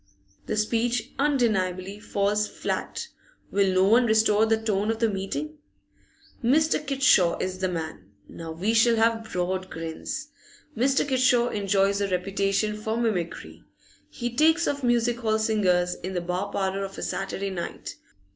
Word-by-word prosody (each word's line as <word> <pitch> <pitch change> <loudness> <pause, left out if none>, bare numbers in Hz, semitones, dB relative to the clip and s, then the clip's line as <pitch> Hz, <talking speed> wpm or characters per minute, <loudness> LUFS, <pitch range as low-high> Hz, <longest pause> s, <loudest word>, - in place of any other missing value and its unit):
The - - -2
speech 230 +3 0
undeniably 205 -9 0
falls 210 +1 0
fiat. 470 - -4 0.4
Will 195 -1 +2
no 185 0 +3
one 230 +5 +4
restore 220 0 +4
the 225 0 +3
tone 210 -1 -1
of 225 - 0
the 230 0 +2
meeting? 285 +10 -4 0.8
Mr. 305 +5 +3
Kitshaw 265 - +3
is 185 0 -3
the 190 - 0
man! 160 - -5 0.2
Now 165 -1 -8
we 190 +8 -1
shall 230 +1 +4
have 225 0 +1
broad 185 +1 -2
grins. 165 - -5 0.5
Mr. 270 +4 +2
Kitshaw 250 -2 +3
enjoys 200 0 +1
a 200 - +1
reputation 195 +3 0
for 220 +1 -2
mimicry; 170 - -3 0.5
he 240 0 -5
takes 320 +4 +4
off 280 0 -1
music 240 0 +2
hall 220 -2 +1
singers 190 -5 +1
in 185 +1 -5
the 175 - 0
bar 180 +1 -3
parlour 195 0 -1
of 195 0 -7
a - - -5
Saturday 195 0 -3
night. 175 -2 -6
210 Hz, 150 wpm, -26 LUFS, 190-235 Hz, 0.8 s, one